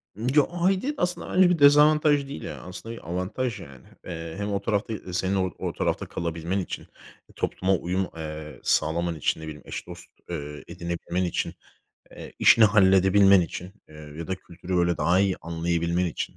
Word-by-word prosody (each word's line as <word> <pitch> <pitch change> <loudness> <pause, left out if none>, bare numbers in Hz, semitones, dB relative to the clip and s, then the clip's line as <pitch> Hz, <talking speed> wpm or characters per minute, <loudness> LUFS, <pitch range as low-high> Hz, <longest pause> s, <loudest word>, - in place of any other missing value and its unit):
Ya, 130 +7 +3
aidiyet 190 +11 0
aslında 180 0 -2
bence 185 -1 +6
bir 170 -3 +1
dezavantaj 145 0 +5
değil 110 - -7
ya. - - -7
Aslında 110 +6 -8
bir 85 - -11
avantaj 100 +7 -2
yani. 65 -3 -13 0.2
Eee, 80 -2 -6
hem 100 0 -3
o 100 0 -1
tarafta, 105 +1 -1
eee, 95 -3 -7
senin 95 +1 0
o 95 -1 0
o - - -3
tarafta - - -1
kalabilmen 85 +3 -3
için, 90 - -6 0.5
topluma 95 +1 0
uyum, 90 +2 -1
eee, 75 -1 -7
sağlaman 85 +1 +1
için, 80 +1 -1
ne - - -8
bileyim, 75 -1 -8
eş - - -6
dost, - - -10 0.2
eee, 75 -3 -6
edinebilmen 85 +1 -3
için, 90 - -2 0.6
eee, - - -10
işini 115 -2 +7
halledebilmen 95 -1 +6
için, 90 +3 -5 0.2
eee, 75 - -16 0.2
ya 85 - -5
da 95 - -1
kültürü, 90 0 -6
böyle, 85 0 +2
daha 90 +3 +3
iyi 95 -2 +1
anlayabilmen 85 +1 -1
için. 85 - -4
95 Hz, 175 wpm, -25 LUFS, 85-110 Hz, 0.6 s, işini